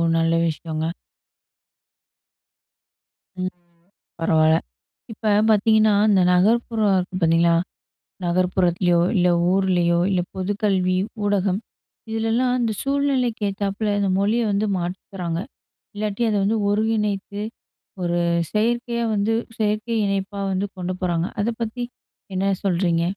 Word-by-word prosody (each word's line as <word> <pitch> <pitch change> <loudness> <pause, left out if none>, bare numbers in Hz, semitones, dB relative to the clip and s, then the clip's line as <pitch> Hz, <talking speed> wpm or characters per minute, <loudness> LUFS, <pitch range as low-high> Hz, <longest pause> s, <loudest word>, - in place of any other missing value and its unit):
நல்ல 165 0 +2
விஷயங்க. 160 0 -3 2.5
ம். 185 0 -3 0.7
பரவால்ல, 160 -1 +4 0.6
இப்ப 215 0 -1 0.2
பார்த்தீங்கன்னா 215 0 +4 0.2
இந்த 190 -2 +4
நகர்ப்புற 225 +5 +2 0.2
இருக்கு 180 +1 -4
பார்த்தீங்களா, 165 +1 +4 0.7
நகர்ப்புறத்திலயோ, 175 0 +2
இல்ல 180 -2 +3 0.2
ஊர்லயோ, 180 -3 +2
இல்ல 180 - +2
பொது 190 +2 -1
கல்வி 185 -3 +2 0.3
ஊடகம். 200 -1 +1 0.5
இதுல 225 0 -1
எல்லாம் 250 +1 +2
அந்த 230 -3 0
சூழ்நிலைக்கு 270 -6 0
ஏத்தாப்பில, 200 +1 -2
இந்த 200 - +1
மொழிய 215 +4 +2
வந்து 205 +2 0
மாத்திகிறாங்க. 180 -1 -4 0.6
இல்லாட்டி 210 +2 -2
அத 210 - 0
வந்து 215 +3 +1
ஒருங்கிணைத்து 210 -2 -1 0.6
ஒரு 175 0 0 0.3
செயற்கையா 235 +2 0
வந்து 205 +2 +1 0.2
செயற்கை 215 +1 -1
இணைப்பா 195 0 -2
வந்து 190 +1 0
கொண்டு 180 0 -3
போறாங்க. 170 -2 0 0.2
அத 220 - 0
பத்தி 230 +2 -3 0.5
என்ன 195 +1 +1
சொல்றீங்க? 175 -3 +1
195 Hz, 110 wpm, -22 LUFS, 180-220 Hz, 2.5 s, பரவால்ல